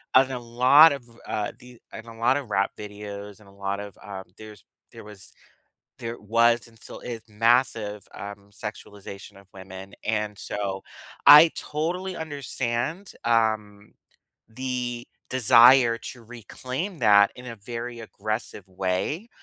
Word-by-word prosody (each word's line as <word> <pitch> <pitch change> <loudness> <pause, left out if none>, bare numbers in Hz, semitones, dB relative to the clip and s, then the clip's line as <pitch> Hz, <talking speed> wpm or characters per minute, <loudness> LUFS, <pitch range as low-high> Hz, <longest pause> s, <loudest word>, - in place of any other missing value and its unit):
in 130 0 +6
a 125 - -3
lot 125 +7 +6
of, 140 -3 -7 0.2
uh, 105 -1 -2
the 125 -1 -15
in 110 - -8
a 115 -1 -12
lot 125 +4 +3
of 125 -7 -7
rap 100 0 +2
videos 105 -1 -8
and 105 - -19
a - - -17
lot 100 0 -4
of 100 -1 -9
uh, 95 -2 -7 0.2
there's 105 -3 -12 0.3
there - - -11
was 105 -3 -12 0.7
there 115 +1 -5
was 115 +3 +2
and 115 -1 -20
still - - -10
is 115 -2 -6
massive, 115 -2 +1
um, 100 0 -9
sexualization 100 -2 -9
of 100 - -19
women, 95 +1 -10
and 105 -1 -1
so 95 -2 -4 0.5
I 155 +3 +10
totally 180 +5 -3
understand, 145 +2 -3
um, 110 -3 0 0.6
the 125 0 -4 0.2
desire 120 0 +6
to 120 - -14
reclaim 130 - -6
that 100 -3 +6
in 125 0 -11
a 115 - -7
very 120 +3 -7
aggressive 110 -2 -5
way. 95 - -2
115 Hz, 140 wpm, -25 LUFS, 105-125 Hz, 0.7 s, I